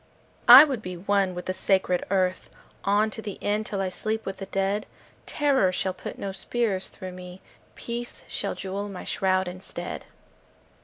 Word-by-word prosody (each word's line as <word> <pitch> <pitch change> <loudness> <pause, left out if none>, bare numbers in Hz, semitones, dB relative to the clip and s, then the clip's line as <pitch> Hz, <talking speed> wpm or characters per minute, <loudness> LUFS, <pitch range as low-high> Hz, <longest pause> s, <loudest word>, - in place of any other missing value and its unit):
I 255 +4 +13
would 270 -7 -1
be 180 -3 -6
one 195 0 +1
with 180 - -6
the 185 - -1
sacred 185 -1 +1
earth 185 -1 0 0.4
On 210 +2 +3
to 220 - -6
the 205 -3 -6
end, 210 +1 -1
till 200 -2 -2
I 190 - 0
sleep 220 +4 -3
with 195 0 -4
the 195 - -7
dead. 195 +2 -1 0.4
Terror 270 -10 +2
shall 185 +1 -1
put 185 - -8
no 195 - -4
spears 195 0 -2
through 185 0 -8
me. 180 0 -10 0.4
Peace 240 0 -6
shall - - -3
jewel 200 +1 -4
my 190 -2 -7
shroud 185 -1 +1
instead. 185 +1 -6
195 Hz, 170 wpm, -26 LUFS, 185-215 Hz, 0.4 s, I